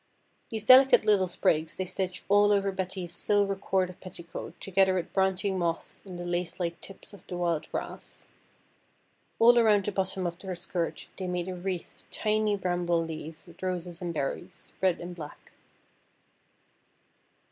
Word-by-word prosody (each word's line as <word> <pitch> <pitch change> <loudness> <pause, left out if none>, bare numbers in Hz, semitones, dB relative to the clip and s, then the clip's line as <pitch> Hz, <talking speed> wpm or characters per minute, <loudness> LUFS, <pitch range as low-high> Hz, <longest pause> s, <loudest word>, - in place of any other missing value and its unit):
These 220 -2 -4
delicate 255 -2 +8
little 200 -3 +4
sprigs 160 -2 +1
they 185 - -2
stitched 185 0 -3
all 205 +1 +5
over 200 -1 +2
Betty's 185 -2 -4
silver 200 +1 +2
corded 190 -2 -1
petticoat 170 -2 -8
together 190 0 +3
with 180 - -3
branching 190 0 +1
moss 170 -1 -2
and 185 -3 -8
the 175 - -5
lace 175 0 -2
like 170 -1 -2
tips 195 +2 -10
of 200 - -15
the 180 - -5
wild 170 -3 -1
grass. - - -5 1.1
All 240 +1 +7
around 210 -4 +4
the 210 - 0
bottom 190 -1 -1
of 170 0 -4
her 190 -2 -4
skirt 175 -1 -3
they 185 - -3
made 180 0 -2
a - - -3
wreath 180 -1 -5
of - - -31
tiny 215 -1 +1
bramble 175 -3 0
leaves 160 0 -7
with 170 -2 -16
roses 180 -2 -3
and 175 -1 -2
berries, 140 -4 -4
red 185 -2 +3
and 175 +1 -7
black. 150 -3 -10
185 Hz, 160 wpm, -29 LUFS, 175-195 Hz, 1.1 s, delicate